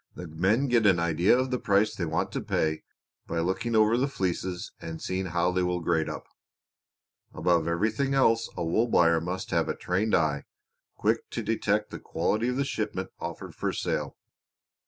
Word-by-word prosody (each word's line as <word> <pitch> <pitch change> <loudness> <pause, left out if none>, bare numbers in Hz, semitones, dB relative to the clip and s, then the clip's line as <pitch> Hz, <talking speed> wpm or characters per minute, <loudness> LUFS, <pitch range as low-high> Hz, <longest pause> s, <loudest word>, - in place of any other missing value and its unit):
The 90 - -7
men 95 - +1
get 120 -4 +3
an 95 -4 +4
idea 85 +6 +3
of 130 0 -1
the 125 - 0
price 100 +1 +2
they 85 - -2
want 80 +1 -1
to - - -3
pay 80 0 0 0.5
by 85 - -3
looking 95 +8 -1
over 110 +1 +4
the 135 +3 +2
fleeces 90 -6 -3
and 80 0 -6
seeing 95 0 -2
how 85 +1 +1
they 90 0 0
will 90 0 0
grade 80 -1 0
up. - - -6 1.1
Above 85 -2 +2
everything 110 +11 0
else 115 -4 +3
a 85 - -1
wool 110 +9 +2
buyer 85 -6 +4
must 90 +2 -4
have - - +1
a - - -1
trained 95 +5 0
eye, 75 -3 +1 0.5
quick - - 0
to - - -4
detect - - 0
the - - -6
quality 110 +3 -1
of 125 - 0
the 140 - +1
shipment 105 -7 -3
offered - - -6
for - - -2
sale. - - -3
95 Hz, 185 wpm, -27 LUFS, 85-110 Hz, 1.1 s, an